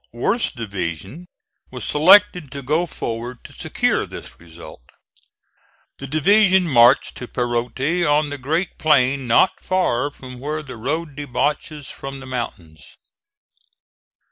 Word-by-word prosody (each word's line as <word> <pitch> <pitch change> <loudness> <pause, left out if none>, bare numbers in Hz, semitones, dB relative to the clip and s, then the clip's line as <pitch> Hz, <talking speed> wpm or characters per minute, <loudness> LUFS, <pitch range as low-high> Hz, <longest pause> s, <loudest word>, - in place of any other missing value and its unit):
Worth's 125 - 0
division 100 - -6 0.4
was 125 -1 -7
selected 180 -1 +5
to 140 -1 -6
go 155 +6 0
forward 120 -3 -6
to - - -13
secure - - -1
this - - -10
result. 80 -4 -13 1.2
The 135 - -7
division 190 +5 +4
marched 120 -3 +4
to 125 - -7
Perote 125 +8 -1
on 150 -1 +2
the 145 - -5
great 160 +7 -2
plain, 140 -3 +2
not 120 +10 +3
far 145 -8 0
from 130 -3 -12
where 150 +3 -4
the 130 -4 -9
road 145 +6 -3
debouches 145 +1 -3
from 135 0 -8
the 135 - -10
mountains. 90 - -7
135 Hz, 125 wpm, -21 LUFS, 120-155 Hz, 1.2 s, selected